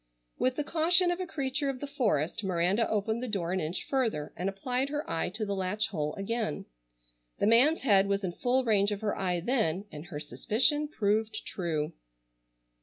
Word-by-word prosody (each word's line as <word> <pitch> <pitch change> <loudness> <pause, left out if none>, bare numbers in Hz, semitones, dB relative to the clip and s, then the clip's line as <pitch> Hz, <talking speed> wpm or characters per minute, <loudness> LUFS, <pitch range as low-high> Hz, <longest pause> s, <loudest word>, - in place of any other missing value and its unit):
With 255 0 +2
the 300 - -1
caution 345 +4 +4
of 350 - -2
a 370 - -3
creature 280 -2 -1
of 265 -2 -3
the 285 - -4
forest 210 - 0
Miranda 185 +4 +1
opened 220 +2 0
the 255 - -3
door 185 -6 -2
an 190 - 0
inch 160 +1 -3
further, 225 - -1
and 180 +3 -1
applied 250 +7 -2
her 295 +1 -3
eye 165 - -1
to 215 0 -2
the 200 - -2
latch 195 +3 -1
hole 150 -5 -2
again. 215 -3 -2 0.7
The - - +1
man's 250 +9 +5
head 200 -6 +4
was 200 0 0
in 185 - -1
full 250 +8 +1
range 205 -2 +3
of 205 0 -3
her 215 -2 -1
eye 180 -2 -1
then, 200 -5 0
and 150 +1 -8
her 155 -5 -6
suspicion 265 - +1
proved 215 -4 -1
true. 160 -5 -2
215 Hz, 190 wpm, -30 LUFS, 185-260 Hz, 0.7 s, man's